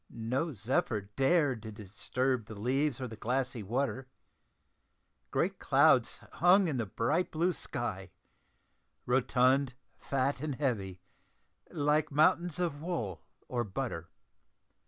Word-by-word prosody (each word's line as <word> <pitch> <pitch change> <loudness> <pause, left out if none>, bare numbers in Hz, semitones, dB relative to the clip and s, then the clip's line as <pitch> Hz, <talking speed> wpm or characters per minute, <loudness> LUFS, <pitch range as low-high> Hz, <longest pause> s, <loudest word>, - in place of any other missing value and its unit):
No 125 +8 -2
zephyr 125 - 0
dared 135 -4 +2
to 110 0 -7
disturb 110 +4 -2
the 110 - -8
leaves 135 +4 0
or 130 - -3
the 110 - -8
glassy 125 +2 -2
water; 130 +5 -2 1.2
great - - 0
clouds - - +4
hung 180 +2 +5
in 145 -5 -1
the 115 -3 -2
bright 150 - 0
blue 170 +3 +1
sky 95 - -4 1.0
rotund, 130 +1 +2 0.2
fat, 135 0 -1
and 150 -3 -2
heavy, 100 -10 -2 0.7
like 150 +1 +1
mountains 160 +4 +3
of 165 -5 -2
wool 115 - -3 0.3
or 120 -1 -1
butter. 95 - -4
130 Hz, 115 wpm, -31 LUFS, 115-150 Hz, 1.2 s, hung